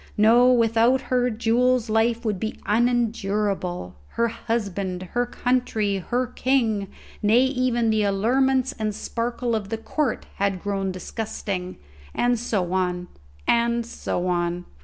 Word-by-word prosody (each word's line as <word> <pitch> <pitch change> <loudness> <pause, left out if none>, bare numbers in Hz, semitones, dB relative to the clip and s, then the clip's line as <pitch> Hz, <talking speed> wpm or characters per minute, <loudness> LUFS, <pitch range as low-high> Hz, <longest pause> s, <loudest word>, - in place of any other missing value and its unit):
No; 235 +4 +6
without 230 +1 +4
her 250 -1 +1
Jules 240 +2 +2
life 225 +2 +1
would 210 -4 -1
be 220 - -3
unendurable; 210 - 0
her 235 0 0
husband, 200 -5 -3
her 245 0 +1
country, 240 -5 0
her 245 +7 -1
king, 235 -5 0 0.3
nay, 220 +3 +4
even 250 -3 +1
the 220 -1 +2
allurements 255 +6 +2
and 215 -1 -1
sparkle 235 +1 -2
of 210 -3 -2
the 225 - -2
court, 265 +3 -2
had 195 -2 -1
grown 195 -2 -1
disgusting; 185 -1 -5 0.4
and 245 -1 +2
so 190 -6 -1
on, 180 -1 -1 0.4
and 235 0 +2
so 180 -5 -3
on. 175 0 -1
225 Hz, 130 wpm, -24 LUFS, 200-245 Hz, 0.4 s, No